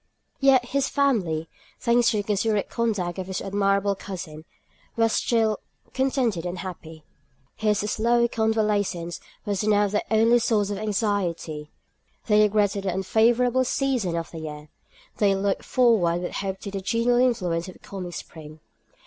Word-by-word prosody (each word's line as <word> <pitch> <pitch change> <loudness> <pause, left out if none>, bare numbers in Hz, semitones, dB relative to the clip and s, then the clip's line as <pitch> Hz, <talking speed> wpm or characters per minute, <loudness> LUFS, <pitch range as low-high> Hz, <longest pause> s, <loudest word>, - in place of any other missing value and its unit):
Yet 260 -3 +4
his 275 -1 0
family, 195 - +1 0.3
thanks 235 0 +3
to 220 - 0
the 205 - -1
considerate 210 +1 0
conduct 200 -7 -1
of 185 - -5
his 190 -1 -3
admirable 200 0 +1
cousin, 175 -5 -8 0.5
were 225 0 +3
still 220 -2 +1 0.3
contented 260 -9 0
and 175 +1 -4
happy. 165 -4 -8 0.5
His 210 -1 +1
slow 235 +3 +2
convalescence 210 -7 0 0.3
was 205 -1 -1
now 205 -1 +3
their 210 +1 0
only 230 +2 +4
source 210 -3 +1
of 200 - -3
anxiety. 190 -8 -2 0.6
They 210 -1 +4
regretted 205 -1 +2
the 185 - 0
unfavourable 235 +6 +3
season 250 -9 0
of 165 0 -4
the 165 - -7
year; 150 -1 -8 0.5
they 200 -2 +3
looked 195 0 -1
forward 190 -9 +3
with - - -3
hope 195 -1 -3
to 200 - -6
the 195 -1 -4
genial 230 +4 +1
influence 185 -9 +1
of 185 - -8
the - - -20
coming 185 -3 -7
spring. 155 -2 -10
205 Hz, 150 wpm, -25 LUFS, 180-230 Hz, 0.6 s, Yet